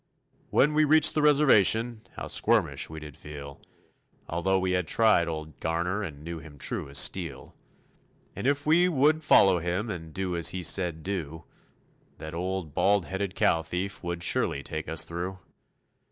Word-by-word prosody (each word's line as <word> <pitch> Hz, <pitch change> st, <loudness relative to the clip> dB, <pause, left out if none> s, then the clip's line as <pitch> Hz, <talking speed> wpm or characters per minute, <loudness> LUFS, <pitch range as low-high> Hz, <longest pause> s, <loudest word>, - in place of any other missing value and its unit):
When 150 Hz, +2 st, +3 dB
we 155 Hz, +1 st, +4 dB
reached 155 Hz, +1 st, +5 dB
the 155 Hz, -, +1 dB
Reservation, 120 Hz, -6 st, +3 dB
how -, -, -6 dB
squirmish -, -, +1 dB
we 80 Hz, 0 st, -8 dB
did 75 Hz, -2 st, -10 dB
feel, 75 Hz, -2 st, -10 dB, 0.7 s
Although 90 Hz, +3 st, 0 dB
we 95 Hz, 0 st, -1 dB
had 90 Hz, -2 st, 0 dB
tried 110 Hz, -5 st, +3 dB
old 80 Hz, -2 st, -6 dB
Garner 85 Hz, +5 st, -1 dB
and 75 Hz, -7 st, -7 dB
knew 85 Hz, 0 st, -6 dB
him 75 Hz, -2 st, -13 dB
true 70 Hz, -, -4 dB
as 70 Hz, -, -2 dB
steel. 80 Hz, -5 st, -1 dB, 0.8 s
And -, -, -3 dB
if 145 Hz, 0 st, 0 dB
we 170 Hz, +4 st, +4 dB
would 155 Hz, +1 st, +2 dB
follow 95 Hz, -, +5 dB
him 90 Hz, +6 st, -2 dB
and 80 Hz, -4 st, -7 dB
do 95 Hz, +1 st, -3 dB
as 85 Hz, -, +1 dB
he 90 Hz, -1 st, -5 dB
said 85 Hz, -2 st, 0 dB
do, 80 Hz, -5 st, -5 dB, 0.7 s
That 80 Hz, +1 st, -8 dB
old 90 Hz, -2 st, -4 dB
bald 100 Hz, +1 st, +2 dB
headed 95 Hz, 0 st, -4 dB
cow 100 Hz, -6 st, +2 dB
thief 90 Hz, +5 st, -5 dB
would 85 Hz, 0 st, -4 dB
surely -, -, 0 dB
take -, -, -5 dB
us 80 Hz, 0 st, +2 dB
through. 85 Hz, +3 st, -5 dB
90 Hz, 170 wpm, -27 LUFS, 80-105 Hz, 0.8 s, reached